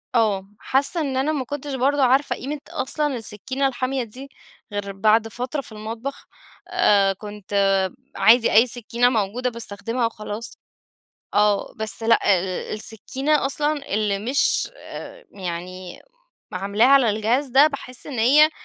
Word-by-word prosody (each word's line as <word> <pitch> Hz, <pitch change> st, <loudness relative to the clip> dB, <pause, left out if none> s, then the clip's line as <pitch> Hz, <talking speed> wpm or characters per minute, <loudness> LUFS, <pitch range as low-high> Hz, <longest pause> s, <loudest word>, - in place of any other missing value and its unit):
آه 205 Hz, -4 st, +2 dB
حاسّة 280 Hz, +5 st, +1 dB
إن 270 Hz, -3 st, -2 dB
أنا 275 Hz, +4 st, +1 dB
ما 270 Hz, -4 st, -2 dB
كنتش 285 Hz, +2 st, -5 dB
برضو 275 Hz, +3 st, +1 dB
عارفة 265 Hz, +2 st, +3 dB
قيمة 290 Hz, +3 st, -5 dB
أصلًا 295 Hz, +1 st, -1 dB
السكينة 260 Hz, +4 st, -2 dB
الحامية 260 Hz, 0 st, -2 dB
دي 255 Hz, +5 st, -10 dB, 0.4 s
غير 205 Hz, -1 st, -3 dB
بعد 215 Hz, +3 st, +3 dB
فترة 250 Hz, +6 st, -4 dB
في 260 Hz, -, -14 dB
المطبخ، 225 Hz, +5 st, -6 dB, 0.4 s
آآ 205 Hz, -, +3 dB
كنت 205 Hz, 0 st, -10 dB, 0.6 s
عادي، 230 Hz, +1 st, +5 dB
أي 230 Hz, +4 st, +6 dB
سكينة 245 Hz, +1 st, +1 dB
موجودة 235 Hz, +2 st, -1 dB
باستخدمها 230 Hz, +1 st, -3 dB
وخلاص. 215 Hz, 0 st, -7 dB, 0.8 s
آه 205 Hz, -1 st, +2 dB
بس 220 Hz, +1 st, -3 dB
لأ، 230 Hz, 0 st, +4 dB, 0.2 s
ال 190 Hz, -, -4 dB, 0.3 s
السكينة 265 Hz, +8 st, -1 dB
أصلًا 290 Hz, -2 st, -1 dB
اللي 210 Hz, -2 st, +1 dB
مش 255 Hz, -, +1 dB
آآ -, -, -10 dB
يعني 180 Hz, 0 st, -7 dB, 0.5 s
عاملاها 200 Hz, +5 st, +2 dB
على 270 Hz, -4 st, +6 dB
الجهاز 225 Hz, +7 st, +1 dB
ده 270 Hz, +4 st, +6 dB
باحس 270 Hz, -4 st, -6 dB
إن 275 Hz, -5 st, -5 dB
هي 290 Hz, +7 st, +6 dB
235 Hz, 140 wpm, -23 LUFS, 210-275 Hz, 0.8 s, أي